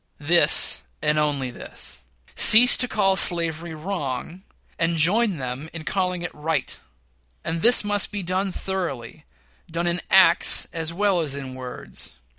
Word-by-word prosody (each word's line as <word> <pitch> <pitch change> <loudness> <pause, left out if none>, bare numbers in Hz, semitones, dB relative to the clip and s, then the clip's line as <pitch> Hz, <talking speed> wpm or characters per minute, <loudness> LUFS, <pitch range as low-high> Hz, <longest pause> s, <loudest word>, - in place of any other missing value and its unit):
This, 170 +3 +3 0.2
and 150 0 0
this - - +1
only: 140 -4 -3 0.8
cease 240 +3 +7
to 250 - +1
call 195 -4 +1
slavery 170 -2 +2
wrong, 160 -1 -6 0.4
and 165 0 -1
join 195 +4 +1
them 130 +3 -7
in 165 -2 -8
calling 180 -1 -3
it 175 - -6
right. 160 +2 -3 0.7
And 165 +1 -5
this 240 +2 +6
must 205 -1 +2
be 205 -2 -5
done 185 +2 -2
thoroughly 160 -8 -6 0.4
done 170 +1 -4
in 175 0 -2
acts 190 -1 +5
as 165 -1 -3
well 195 +1 0
as 145 -4 -3
in 135 -2 -8
words. 130 -1 -9
170 Hz, 145 wpm, -22 LUFS, 150-190 Hz, 0.8 s, cease